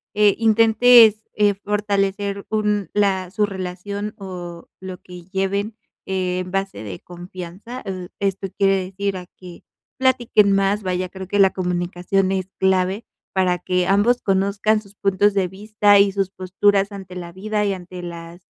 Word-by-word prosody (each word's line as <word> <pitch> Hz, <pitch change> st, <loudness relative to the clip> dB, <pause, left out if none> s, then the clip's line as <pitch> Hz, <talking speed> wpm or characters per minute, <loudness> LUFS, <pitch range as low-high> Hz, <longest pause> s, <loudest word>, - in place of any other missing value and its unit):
eh, 210 Hz, -1 st, +5 dB
intentes, 225 Hz, 0 st, +6 dB
eh, 205 Hz, -1 st, +3 dB
fortalecer 200 Hz, -1 st, -1 dB
un 210 Hz, -4 st, 0 dB
la 190 Hz, -3 st, +1 dB
su 210 Hz, +3 st, +1 dB
relación 200 Hz, +2 st, -5 dB
o 175 Hz, -3 st, -8 dB
lo 185 Hz, -1 st, -7 dB
que 180 Hz, -1 st, -12 dB
lleven 200 Hz, +3 st, -2 dB, 0.3 s
en 185 Hz, -1 st, -2 dB
base 195 Hz, -, -3 dB
de 95 Hz, -4 st, -7 dB
confianza, 180 Hz, +7 st, -9 dB
oh, 185 Hz, -2 st, -5 dB
esto 195 Hz, -1 st, -1 dB
quiere 195 Hz, -1 st, +3 dB
decir 195 Hz, +1 st, -3 dB
a 180 Hz, -1 st, -9 dB
que 180 Hz, -2 st, -12 dB, 0.4 s
platiquen 240 Hz, -6 st, +3 dB
más, 195 Hz, +1 st, +1 dB
vaya, 185 Hz, 0 st, -2 dB
creo 190 Hz, 0 st, -8 dB
que 205 Hz, -, -1 dB
la 195 Hz, -1 st, +6 dB
comunicación 180 Hz, +1 st, -1 dB
es 190 Hz, -1 st, -1 dB
clave 190 Hz, +3 st, +1 dB, 0.3 s
para 185 Hz, -2 st, +1 dB
que 180 Hz, 0 st, 0 dB
ambos 205 Hz, +5 st, +3 dB
conozcan 200 Hz, +2 st, +1 dB
sus 200 Hz, -1 st, -18 dB
puntos 200 Hz, +1 st, +2 dB
de 190 Hz, -2 st, +2 dB
vista 205 Hz, +1 st, +3 dB
y 200 Hz, 0 st, +4 dB
sus 195 Hz, -1 st, -1 dB
posturas 195 Hz, +2 st, +1 dB
ante 190 Hz, -2 st, -9 dB
la 175 Hz, -1 st, -7 dB
vida 210 Hz, +3 st, -2 dB
y 200 Hz, -, +1 dB
ante 180 Hz, -1 st, -8 dB
las 170 Hz, 0 st, -9 dB
195 Hz, 155 wpm, -21 LUFS, 185-205 Hz, 0.4 s, intentes